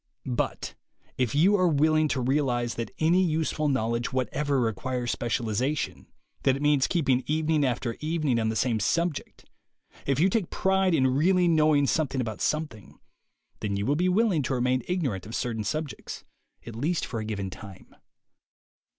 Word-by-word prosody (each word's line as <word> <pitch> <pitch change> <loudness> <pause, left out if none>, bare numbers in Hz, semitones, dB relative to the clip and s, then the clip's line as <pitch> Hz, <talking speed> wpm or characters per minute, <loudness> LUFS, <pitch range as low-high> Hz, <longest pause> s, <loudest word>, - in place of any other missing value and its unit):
But - - -2 0.4
if 125 -1 -1
you 185 +8 +5
are 185 -1 +3
willing 155 0 +3
to 135 -3 -1
realize 125 -3 0
that 115 - -4
any 170 +4 +3
useful 155 -3 0
knowledge 115 -3 0
whatever 135 +3 0
requires 120 +2 -1
specialization, 120 +4 -2 0.3
that 135 -1 +3
it 135 - -6
means 145 -3 +3
keeping 135 -7 +1
evening 155 0 +1
after 120 -2 -1
evening 155 -6 0
on 110 -1 0
the 110 - -2
same 115 -1 +1
subject; 165 - -2 0.6
if 140 0 +1
you 175 - +5
take 195 -2 0
pride 190 -2 +2
in 130 -4 +3
really 175 +8 +3
knowing 155 -3 +4
something 140 -2 0
about 110 -4 -3
something, 150 - -3 0.6
then 100 -2 -2
you 100 - -2
will 145 - +2
be 180 +4 +1
willing 195 -4 +2
to 135 0 -1
remain 125 +1 +1
ignorant 135 - -2
of 110 - -6
certain 115 -3 -2
subjects, 150 +5 -5 0.4
at 115 - -8
least 155 +9 -1
for 115 - -4
a - - -3
given 100 -3 -4
time. 100 -1 -12
135 Hz, 165 wpm, -27 LUFS, 120-155 Hz, 0.6 s, you